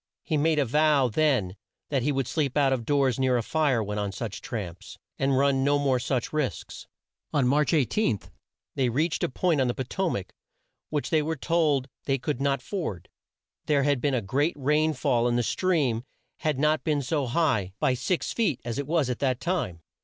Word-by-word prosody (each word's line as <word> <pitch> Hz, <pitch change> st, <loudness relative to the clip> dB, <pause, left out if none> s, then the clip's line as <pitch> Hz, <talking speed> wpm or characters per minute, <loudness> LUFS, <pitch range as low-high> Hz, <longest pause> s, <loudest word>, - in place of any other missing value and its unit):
He 160 Hz, -, -1 dB
made 155 Hz, +1 st, +2 dB
a 145 Hz, -, +3 dB
vow 145 Hz, 0 st, +3 dB
then 120 Hz, -8 st, +1 dB, 0.3 s
that 140 Hz, -3 st, +1 dB
he 145 Hz, +5 st, +1 dB
would 135 Hz, -2 st, 0 dB
sleep 145 Hz, -3 st, -1 dB
out 135 Hz, -2 st, +4 dB
of 120 Hz, -4 st, -3 dB
doors 135 Hz, -4 st, +2 dB
near 130 Hz, -1 st, +2 dB
a 120 Hz, -, -1 dB
fire 140 Hz, -5 st, +1 dB
when 105 Hz, 0 st, -3 dB
on 100 Hz, -1 st, -2 dB
such 105 Hz, 0 st, -5 dB
tramps, 90 Hz, -7 st, -6 dB, 0.2 s
and 135 Hz, -1 st, +2 dB
run 135 Hz, -1 st, +3 dB
no 145 Hz, +1 st, +3 dB
more 135 Hz, -3 st, +1 dB
such 125 Hz, +1 st, -2 dB
risks. 150 Hz, -4 st, -3 dB, 0.5 s
On 140 Hz, -4 st, +3 dB
March 145 Hz, +2 st, +2 dB
18, 150 Hz, -, +1 dB, 0.5 s
they 130 Hz, -2 st, +1 dB
reached 155 Hz, +7 st, 0 dB
a -, -, +1 dB
point 160 Hz, +1 st, +1 dB
on 130 Hz, -, +2 dB
the 120 Hz, -, -1 dB
Po 130 Hz, -, -2 dB
to 185 Hz, +8 st, -1 dB
mac, 100 Hz, -, -4 dB, 0.6 s
which 150 Hz, -2 st, -2 dB
they 160 Hz, -2 st, +4 dB
were 160 Hz, +2 st, -2 dB
told 150 Hz, -4 st, +1 dB, 0.2 s
they 135 Hz, -1 st, +1 dB
could 135 Hz, 0 st, -3 dB
not 140 Hz, -2 st, 0 dB
ford. 155 Hz, -, -4 dB, 0.6 s
There 145 Hz, -2 st, +3 dB
had 140 Hz, -3 st, +1 dB
been 140 Hz, 0 st, +1 dB
a 120 Hz, -, -1 dB
great 145 Hz, -, 0 dB
rain 150 Hz, +3 st, +2 dB
fall 125 Hz, -4 st, +1 dB
and 120 Hz, 0 st, +1 dB
the 120 Hz, -, +1 dB
stream 140 Hz, -7 st, +1 dB, 0.3 s
had 155 Hz, -4 st, -1 dB
not 150 Hz, +2 st, +2 dB
been 150 Hz, -3 st, 0 dB
so 140 Hz, 0 st, -1 dB
high, 120 Hz, -, +1 dB
by 135 Hz, -4 st, +2 dB
six 170 Hz, +8 st, -1 dB
feet, 195 Hz, -, 0 dB
as 120 Hz, +2 st, -3 dB
it 140 Hz, -, -3 dB
was 160 Hz, -4 st, +1 dB
at 125 Hz, -2 st, -3 dB
that 130 Hz, -3 st, 0 dB
time. 160 Hz, -, -2 dB
140 Hz, 205 wpm, -26 LUFS, 125-150 Hz, 0.6 s, out